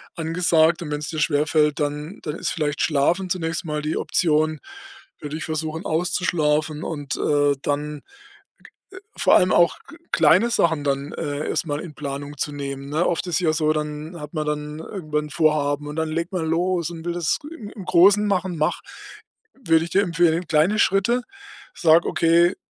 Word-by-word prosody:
angesagt.“ 165 Hz, 0 st, +2 dB
Und 160 Hz, -, -5 dB
wenn's 150 Hz, 0 st, -3 dB
dir 155 Hz, -, -4 dB
schwerfällt, 150 Hz, 0 st, +2 dB
dann 150 Hz, +5 st, -3 dB
dann 150 Hz, -1 st, -4 dB
ist -, -, -2 dB
vielleicht 150 Hz, -3 st, -2 dB
Schlafen 165 Hz, +5 st, +1 dB
zunächst 170 Hz, 0 st, -2 dB
mal 150 Hz, -1 st, -2 dB
die 155 Hz, +1 st, -1 dB
Option. 155 Hz, -2 st, +1 dB, 0.6 s
Würde 150 Hz, +1 st, -5 dB
ich -, -, -6 dB
versuchen, 160 Hz, +2 st, -4 dB
auszuschlafen 155 Hz, -3 st, 0 dB
und, 145 Hz, -3 st, -4 dB
äh, 145 Hz, -1 st, +2 dB
dann 145 Hz, 0 st, -3 dB, 1.2 s
vor -, -, +4 dB
allem 185 Hz, -, +4 dB
auch 170 Hz, 0 st, +4 dB
g -, -, -12 dB, 0.2 s
kleine 170 Hz, +9 st, +5 dB
Sachen 165 Hz, -9 st, +1 dB
dann, 140 Hz, 0 st, -1 dB
äh, 145 Hz, +1 st, -3 dB
erstmal 150 Hz, -3 st, -2 dB
in 165 Hz, -4 st, -9 dB
Planung 145 Hz, 0 st, -6 dB
zu 145 Hz, -, -2 dB
nehmen, 140 Hz, -1 st, -6 dB
ne? 155 Hz, +4 st, 0 dB
Oft 175 Hz, +1 st, -1 dB
ist 175 Hz, -, -1 dB
es -, -, +2 dB
ja 165 Hz, -3 st, +2 dB
so, 155 Hz, 0 st, +1 dB
dann 150 Hz, +2 st, -5 dB
hat 150 Hz, +1 st, -9 dB
man 155 Hz, -2 st, -2 dB
dann 150 Hz, 0 st, -3 dB
irgendwann 155 Hz, -4 st, -4 dB
'n -, -, -10 dB
Vorhaben 150 Hz, -2 st, +1 dB
und 150 Hz, -, -7 dB
dann 160 Hz, 0 st, 0 dB
legt 170 Hz, +3 st, -3 dB
man 180 Hz, -4 st, -2 dB
los 170 Hz, +1 st, 0 dB
und 165 Hz, -2 st, -8 dB
will 175 Hz, -, -1 dB
das 170 Hz, -3 st, 0 dB
im 230 Hz, -11 st, -9 dB
im 205 Hz, -, -9 dB
Großen 200 Hz, +5 st, +5 dB
machen. 185 Hz, -3 st, -1 dB
Mach, 155 Hz, 0 st, 0 dB, 0.7 s
würde 165 Hz, -11 st, +2 dB
ich 170 Hz, -, -10 dB
dir 195 Hz, -, +4 dB
empfehlen, 170 Hz, -1 st, +1 dB
kleine 165 Hz, +8 st, +2 dB
Schritte, 220 Hz, +7 st, +2 dB, 0.5 s
sage: 165 Hz, -1 st, +4 dB
„Okay, 170 Hz, +2 st, +3 dB
160 Hz, 180 wpm, -22 LUFS, 150-175 Hz, 1.2 s, kleine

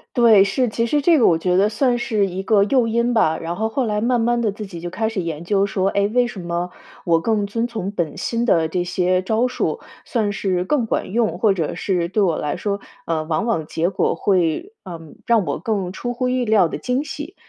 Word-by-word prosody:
对， 230 Hz, -5 st, +6 dB
是。 245 Hz, +6 st, 0 dB
其 230 Hz, +2 st, -1 dB
实 290 Hz, +5 st, +1 dB
这 330 Hz, +2 st, +4 dB
个 245 Hz, -, +4 dB
我 165 Hz, -2 st, +4 dB
觉 180 Hz, +2 st, +1 dB
得 200 Hz, +2 st, +4 dB
算 240 Hz, +3 st, +1 dB
是 225 Hz, -5 st, 0 dB
一 190 Hz, +1 st, -5 dB
个 200 Hz, 0 st, +4 dB
诱 245 Hz, +1 st, +2 dB
因 235 Hz, +2 st, +1 dB
吧， 160 Hz, -8 st, +3 dB
然 165 Hz, +1 st, -4 dB
后 220 Hz, +4 st, -1 dB
后 260 Hz, +4 st, -1 dB
来 210 Hz, -2 st, -1 dB
慢 240 Hz, +2 st, +1 dB
慢 240 Hz, +1 st, +1 dB
地 220 Hz, -3 st, +1 dB
自 210 Hz, +1 st, -7 dB
己 175 Hz, -3 st, -8 dB
就 175 Hz, -, -6 dB
开 220 Hz, +4 st, -1 dB
始 225 Hz, -3 st, -4 dB
研 165 Hz, -1 st, -5 dB
究 195 Hz, +2 st, +1 dB
说， 195 Hz, -1 st, -1 dB
哎， 200 Hz, 0 st, +1 dB
为 245 Hz, 0 st, +3 dB
什 230 Hz, -5 st, -8 dB
么 175 Hz, 0 st, -3 dB, 0.3 s
我 165 Hz, -1 st, +3 dB
更 205 Hz, +3 st, 0 dB
遵 230 Hz, +3 st, -1 dB
从 220 Hz, -5 st, -4 dB
本 175 Hz, -6 st, -3 dB
心 235 Hz, 0 st, -2 dB
的 165 Hz, -8 st, +3 dB
这 175 Hz, +2 st, -1 dB
些 185 Hz, +1 st, 0 dB
招 220 Hz, +5 st, +1 dB
数， 250 Hz, -, -2 dB, 0.3 s
算 215 Hz, -4 st, -1 dB
是 190 Hz, -3 st, -1 dB
更 265 Hz, +1 st, +1 dB
管 215 Hz, -, -2 dB
用， 215 Hz, -7 st, 0 dB
或 210 Hz, +1 st, +4 dB
者 165 Hz, -5 st, -2 dB
是 175 Hz, -3 st, -1 dB
对 210 Hz, +3 st, 0 dB
我 175 Hz, -5 st, +2 dB
来 150 Hz, -, -2 dB
说， 200 Hz, +2 st, -2 dB, 0.3 s
呃， 160 Hz, -2 st, -1 dB
往 155 Hz, +7 st, -1 dB
往 165 Hz, -10 st, 0 dB
结 165 Hz, +3 st, -1 dB
果 195 Hz, -, 0 dB
会， 185 Hz, -, 0 dB
嗯， 165 Hz, -4 st, -9 dB
让 230 Hz, -3 st, +3 dB
我 145 Hz, -, -2 dB
更 195 Hz, 0 st, -2 dB
出 245 Hz, +6 st, -4 dB
乎 250 Hz, +1 st, -1 dB
意 250 Hz, -1 st, 0 dB
料 215 Hz, -5 st, +4 dB
的 -, -, -5 dB
惊 250 Hz, +3 st, -1 dB
喜？ 305 Hz, +5 st, -7 dB
205 Hz, 255 characters per minute, -21 LUFS, 180-235 Hz, 0.3 s, 对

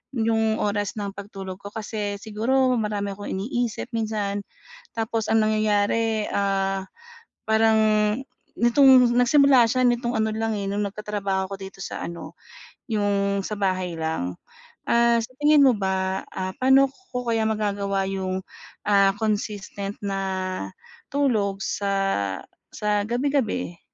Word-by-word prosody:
'yung 220 Hz, -1 st, +1 dB
oras 205 Hz, 0 st, -1 dB
ng 200 Hz, -1 st, -3 dB
pag-tulog 195 Hz, -2 st, -7 dB
ko 200 Hz, -, -7 dB
kasi 210 Hz, -2 st, -4 dB
siguro 250 Hz, +5 st, +1 dB
marami 205 Hz, -2 st, -2 dB
akong 205 Hz, 0 st, -7 dB
iniisip 235 Hz, +4 st, -2 dB
minsan. 210 Hz, -2 st, -2 dB, 0.5 s
Tapos 225 Hz, -1 st, -2 dB
ang 220 Hz, -1 st, +4 dB
nangyayari, 215 Hz, +1 st, +1 dB
ah, 195 Hz, -1 st, 0 dB, 0.6 s
parang, 220 Hz, 0 st, +4 dB, 0.8 s
nitong 250 Hz, 0 st, +6 dB
nag-simula 260 Hz, -1 st, +5 dB
siya 255 Hz, +2 st, +1 dB
nitong 240 Hz, 0 st, 0 dB
ano 220 Hz, 0 st, +1 dB
lang 225 Hz, 0 st, -1 dB
eh, 200 Hz, -, -3 dB
no'ng 205 Hz, +1 st, -1 dB
nagkatrabaho 200 Hz, -2 st, -2 dB
ako -, -, -3 dB
dito 195 Hz, 0 st, -10 dB
sa -, -, -5 dB
ano, 170 Hz, 0 st, -8 dB, 0.6 s
'yung 200 Hz, -2 st, +1 dB
sa 210 Hz, -, -4 dB
bahay 185 Hz, -3 st, -1 dB
lang. 125 Hz, -, -2 dB, 0.5 s
Ah, 235 Hz, 0 st, +4 dB
sa 240 Hz, -, -9 dB
tingin 295 Hz, -1 st, +6 dB
mo 265 Hz, -, +7 dB
ba, 190 Hz, -1 st, -1 dB
ah, 185 Hz, 0 st, -3 dB
paano 265 Hz, +1 st, +5 dB
ko 265 Hz, -7 st, -7 dB
kaya 225 Hz, -1 st, +1 dB
magagawa 200 Hz, -2 st, -1 dB
'yung, 190 Hz, -1 st, -3 dB, 0.4 s
ah, 195 Hz, -1 st, +5 dB
consistent 205 Hz, -2 st, -3 dB
na 195 Hz, -1 st, -2 dB, 0.9 s
tulog 215 Hz, -9 st, +1 dB
sa 195 Hz, -, -1 dB, 0.3 s
sa 210 Hz, -1 st, 0 dB
gabi-gabi? 245 Hz, -8 st, -1 dB
210 Hz, 130 wpm, -24 LUFS, 195-230 Hz, 0.9 s, mo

